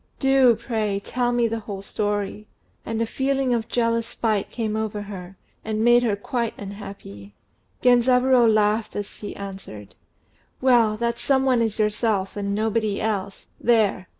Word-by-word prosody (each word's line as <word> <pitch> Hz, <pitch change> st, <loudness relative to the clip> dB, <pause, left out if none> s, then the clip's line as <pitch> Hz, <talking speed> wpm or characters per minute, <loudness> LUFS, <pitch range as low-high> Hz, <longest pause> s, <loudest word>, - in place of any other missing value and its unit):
Do, 270 Hz, -3 st, +5 dB
pray, 220 Hz, -3 st, -2 dB
tell 245 Hz, -1 st, 0 dB
me 240 Hz, -1 st, +2 dB
the 225 Hz, 0 st, -3 dB
whole 200 Hz, -2 st, -7 dB
story." 205 Hz, 0 st, -3 dB, 0.4 s
And 225 Hz, 0 st, -2 dB
a 230 Hz, -, +1 dB
feeling 265 Hz, +1 st, 0 dB
of 230 Hz, -2 st, -1 dB
jealous 230 Hz, -1 st, 0 dB
spite 215 Hz, -3 st, -1 dB
came 220 Hz, -3 st, -3 dB
over 215 Hz, -1 st, -3 dB
her, 190 Hz, -2 st, -9 dB, 0.3 s
and 215 Hz, 0 st, -2 dB
made 240 Hz, +1 st, +6 dB
her 225 Hz, -4 st, +1 dB
quite 235 Hz, +3 st, -3 dB
unhappy. 195 Hz, -, -9 dB, 0.5 s
Genzaburô 250 Hz, -1 st, +5 dB
laughed 215 Hz, +1 st, +1 dB
as 205 Hz, -1 st, -5 dB
he 205 Hz, -, -7 dB
answered 190 Hz, -, -9 dB, 0.7 s
"Well, 235 Hz, -5 st, +4 dB
that 235 Hz, +1 st, -1 dB
some 265 Hz, -1 st, +2 dB
one 255 Hz, -3 st, +3 dB
is 220 Hz, -2 st, -1 dB
yourself, 210 Hz, -2 st, 0 dB
and 200 Hz, -1 st, -2 dB
nobody 215 Hz, -1 st, 0 dB
else. 200 Hz, -3 st, -3 dB
There!" 215 Hz, -5 st, +2 dB
220 Hz, 150 wpm, -23 LUFS, 205-240 Hz, 0.7 s, made